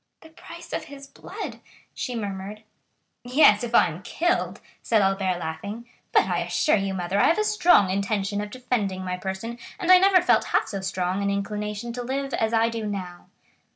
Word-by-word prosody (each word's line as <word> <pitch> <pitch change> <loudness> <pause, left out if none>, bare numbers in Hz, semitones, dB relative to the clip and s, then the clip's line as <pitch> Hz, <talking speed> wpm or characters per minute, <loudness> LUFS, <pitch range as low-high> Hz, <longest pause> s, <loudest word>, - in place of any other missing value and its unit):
"The 320 - -15
price 335 +1 -12
of - - -3
his 280 0 -11
blood!" 275 - -8 0.3
she 250 - -4
murmured. 205 0 -5 0.6
"Yes, 245 -4 +5
if 240 0 -2
I - - +7
am 170 +1 -5
killed," 345 - -1 0.2
said 225 - +2
Albert, 195 -2 +1
laughing. 175 +8 -6 0.3
"But - - +5
I - - -1
assure 300 - +1
you, 195 -2 -1
mother, 185 +2 -1
I - - +5
have 335 - +3
a 425 - +2
strong 350 - +4
intention 200 +1 -1
of 210 - -5
defending 205 -6 -2
my 180 0 -3
person, 190 +6 -5 0.2
and 365 -3 +1
I 365 - +9
never 380 -1 +5
felt - - +3
half - - +1
so 200 -3 -4
strong 185 0 -2
an 200 - 0
inclination 210 +3 -3
to 245 - -4
live 270 +2 -3
as 220 0 0
I 225 0 +3
do 225 -2 -4
now." 185 -4 -6
210 Hz, 190 wpm, -25 LUFS, 195-250 Hz, 0.6 s, I